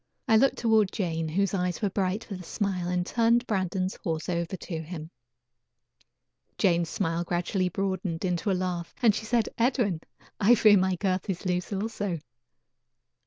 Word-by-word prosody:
I 220 - +5
looked 270 +5 +4
toward 220 -4 +3
Jane, 165 -4 -2
whose 195 +4 0
eyes 180 -2 -1
were 205 -3 0
bright 195 +2 -1
with 195 -4 -6
a - - -9
smile, 185 -2 -2
and 180 0 0
turned 235 +3 +2
Brandon's 190 -2 -1
horse 160 -1 -2
over 170 +1 -2
to 165 -1 -5
him. 160 0 -8 1.5
Jane's 170 -3 +2
smile 170 -3 -1
gradually 180 +2 0
broadened 185 -2 -2
into 180 +2 0
a - - +3
laugh, 180 -2 -3
and 225 -3 +6
she 220 - -4
said: 230 0 +1
"Edwin, 230 - +1 0.4
I 225 +3 +6
fear 210 -2 +6
my 190 -1 +2
girth 185 +1 -1
is 190 0 -3
loose 180 +1 -1
also." 205 -3 -2
185 Hz, 165 wpm, -27 LUFS, 175-205 Hz, 1.5 s, and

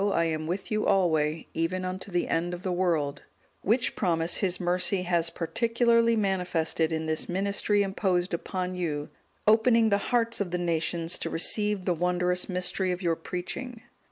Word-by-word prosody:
I 200 -4 +2
am 155 -1 -2
with 185 +5 -4
you 215 0 0
alway, 160 -5 +2
even 175 +3 -1
unto 185 +2 -5
the 175 -2 0
end 175 +2 -1
of 175 - -11
the 185 - -1
world';(201) 165 -6 0 0.4
which 230 +5 +1
promise 165 0 +1
His 185 -3 0
mercy 180 +1 +1
has 170 -2 +1
particularly 230 +6 +2
manifested 180 -5 0
in 160 0 -2
this 160 0 -2
ministry 200 +2 +1
imposed 190 -2 0
upon 185 +1 -3
you, 155 -5 -3 0.4
opening 225 +1 +4
the 200 -1 +2
hearts 230 -2 +1
of 195 - -1
the 180 - -1
nations 170 0 0
to - - -3
receive 205 +3 +1
the 180 - +2
wondrous 180 +2 0
mystery 180 +1 0
of 180 +1 -4
your 170 -1 +2
preaching. 220 +8 -6
180 Hz, 165 wpm, -27 LUFS, 170-200 Hz, 0.4 s, opening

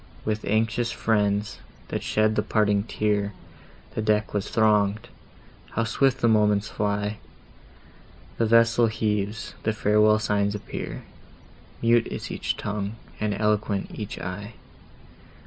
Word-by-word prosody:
With 110 -1 -1
anxious 115 +3 +1
friends, 105 -2 0 0.3
that - - -2
shed 110 0 +1
the 105 - +2
parting 105 -1 +1
tear, 105 -2 0 0.6
The - - -2
deck 105 0 +1
was 105 -2 -2
throng'd—how 110 +1 -1
swift 135 +3 +1
the 120 - +4
moments 105 -2 +3
fly! 105 0 -2 1.2
The 115 - +3
vessel 115 +1 +5
heaves, 105 0 -2
the 110 - 0
farewell 105 0 +4
signs 105 -1 0
appear; 105 - -6 0.8
Mute 115 0 +4
is - - -6
each - - -2
tongue, 105 0 -3 0.2
and 105 -1 0
eloquent 105 -1 0
each 105 -3 -6
eye! 100 +5 -6
105 Hz, 120 wpm, -25 LUFS, 105-110 Hz, 1.2 s, vessel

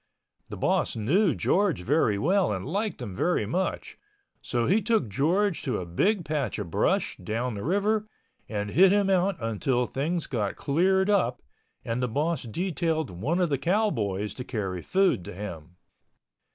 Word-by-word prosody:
The - - -6
boss - - +1
knew 160 - +2
George 185 - +1
very 120 - +2
well 185 - +2
and 95 -2 -3
liked 205 +8 -2
him 95 - -6
very 170 - +1
much, 185 - -3 0.4
so 120 -2 -1
he 205 - +3
took 220 - +1
George 175 - +1
to 125 -6 -1
a 90 - -5
big 175 - +1
patch 150 -3 -2
of 100 -6 -5
brush - - +1
down 120 +3 -3
the 100 - -5
river 205 +6 +1 0.4
and 105 -1 -3
hid 185 - +6
him 200 -1 +3
out 190 +1 +2
until 120 +2 0
things 160 +7 -2
got 105 -6 -2
cleared 190 +7 +2
up 130 - +1 0.4
and 115 +2 -2
the 125 - +1
boss 150 +6 -1
detailed 160 - -2
one 125 - -1
of 180 -2 +2
the 140 - +1
cowboys 115 - 0
to 125 - -6
carry 95 -8 -3
food 190 - +2
to - - -7
him. 90 -4 -8
145 Hz, 165 wpm, -27 LUFS, -, 0.4 s, hid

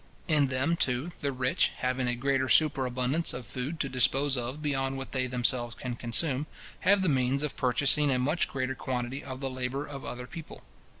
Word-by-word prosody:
In 150 -4 +4
them, 130 +5 +1
too, 130 +6 0
the 140 - 0
rich, 125 -1 +1
having 130 0 -1
a 120 - 0
greater 130 +1 0
superabundance 130 +2 +2
of 125 - -6
food 130 +8 -4
to 140 - 0
dispose 135 +2 +2
of 125 +3 -3
beyond 135 -3 0
what 135 - -6
they 130 -1 0
themselves 120 -1 0
can 125 -2 -5
consume, 130 +5 0 0.3
have 195 +1 +4
the - - +2
means 135 -1 +1
of 150 - -2
purchasing 140 +4 +3
a 130 - +2
much 145 +7 +1
greater 130 0 -2
quantity 125 +1 -3
of 130 0 -7
the 135 - -1
labour 130 +2 -3
of 140 -2 -8
other 125 0 -6
people. 160 +4 -10
130 Hz, 190 wpm, -29 LUFS, 125-145 Hz, 0.3 s, In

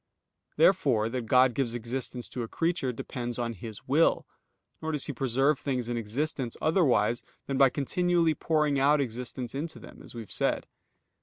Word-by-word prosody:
Therefore 125 - +4
that 120 -1 -4
God 125 +1 +5
gives 120 -1 -1
existence 120 +1 -4
to 125 - -4
a 115 - -3
creature 165 -2 0
depends 120 0 -5
on 120 -1 -2
His 110 +1 -9
will; 150 +5 +3 0.6
nor 160 0 -2
does 150 - -1
He 145 - -4
preserve 135 +3 +1
things 130 -4 -2
in 120 - -2
existence 120 +3 -2
otherwise 125 - +2 0.2
than 135 -1 -2
by 135 -1 +7
continually 170 +4 +1
pouring 150 -3 +1
out 145 +2 +4
existence 125 -1 -4
into 155 +4 -4
them, - - -12
as - - -10
we 115 - -5
have 110 - -12
said. - - 0
130 Hz, 170 wpm, -28 LUFS, 120-150 Hz, 0.6 s, by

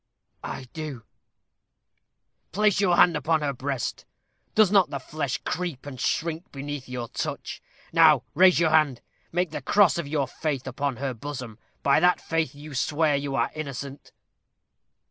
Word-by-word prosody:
"I 135 - -5
do." 150 -7 -6 1.5
"Place 210 +1 +2
your 180 -3 +3
hand 175 -1 +5
upon 160 -1 +1
her 145 -1 -1
breast. 135 -1 -4 0.5
Does 215 -3 +5
not 195 -6 +5
the 140 - -3
flesh 140 0 -3
creep 170 -7 -3
and 135 -3 -7
shrink 165 +2 -2
beneath 140 -1 -6
your 125 -2 -4
touch? - - -5 0.3
Now 155 -6 +6
raise 180 +3 +6
your 165 -2 +3
hand 155 -6 +3 0.3
make 175 -1 0
the 155 - -4
cross 195 +5 +4
of 160 - -4
your 145 -1 0
faith 140 -1 -3
upon 135 +1 -2
her 135 +1 -3
bosom. 125 -3 -7 0.2
By 140 - +4
that 180 0 +4
faith 160 -4 -1
you 150 +1 -10
swear 150 +3 +1
you 140 -1 -2
are - - +1
innocent." 140 -2 -7
145 Hz, 155 wpm, -26 LUFS, 135-165 Hz, 1.5 s, Now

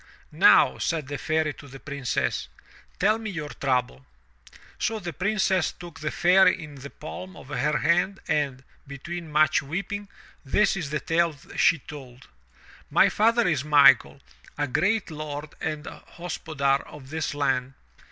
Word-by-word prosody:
"Now," - - +5
said 160 -5 -2
the 145 -2 -4
Fairy 155 0 0
to 140 - -13
the 135 0 -11
Princess, 140 - -2 0.5
"tell 215 +4 +2
me 220 -1 -5
your 155 -6 -5
trouble." 125 - -2 0.7
So 225 - 0
the 175 -5 -6
Princess 190 -1 +1
took 175 -2 -11
the 155 0 -2
Fairy 180 +3 +4
in 150 -1 -10
the 140 0 -9
palm 180 +6 -9
of 130 - -13
her 150 0 0
hand 180 +6 +1
and, 140 -4 -1 0.2
between 160 +4 -7
much 155 0 +3
weeping, 195 +8 -4 0.4
this 200 +10 +2
is 170 -7 -4
the 150 +1 -1
tale 165 -1 +1 0.2
she 165 - +4
told: 130 -4 -12 0.6
"My - - +5
father 230 0 +3
is 150 -6 +1
Michael, 140 -4 +5 0.4
a 145 - 0
great 195 - 0
lord 150 -1 -6
and 155 -1 -3
hospodar 150 -5 -2
of 140 -2 -12
this 160 -2 -3
land. 135 -2 0
155 Hz, 150 wpm, -25 LUFS, 140-175 Hz, 0.7 s, Now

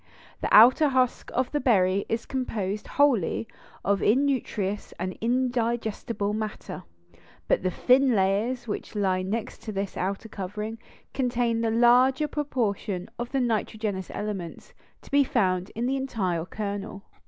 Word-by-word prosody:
The - - -1
outer 260 +7 +7
husk 255 -2 +1
of 255 0 0
the 295 - 0
berry 195 -6 +2
is 225 +1 -1
composed 215 -6 -3
wholly 250 - +2 0.4
of 200 0 +2
innutritious 225 -5 0
and 185 +1 -4
indigestible 235 -3 -1
matter, 215 0 -5 0.7
but - - +2
the 185 - 0
thin 255 +6 +3
layers 205 +6 +1
which 210 - -5
lie 190 -3 +1
next 215 +3 -4
this 195 -1 -3
outer 195 +4 -3
covering 210 +2 -5 0.3
contain 240 -3 0
the 230 - +1
larger 250 +5 +4
proportion 215 -10 -2
of 240 0 -4
the 270 - +1
nitrogenous 215 -4 -1
elements 200 -5 -6 0.3
to - - -16
be 285 0 +5
found 185 -7 0
in 230 +2 -1
the 270 +2 0
entire 190 -11 -2
kernel. 200 0 -5
220 Hz, 135 wpm, -26 LUFS, 200-250 Hz, 0.7 s, outer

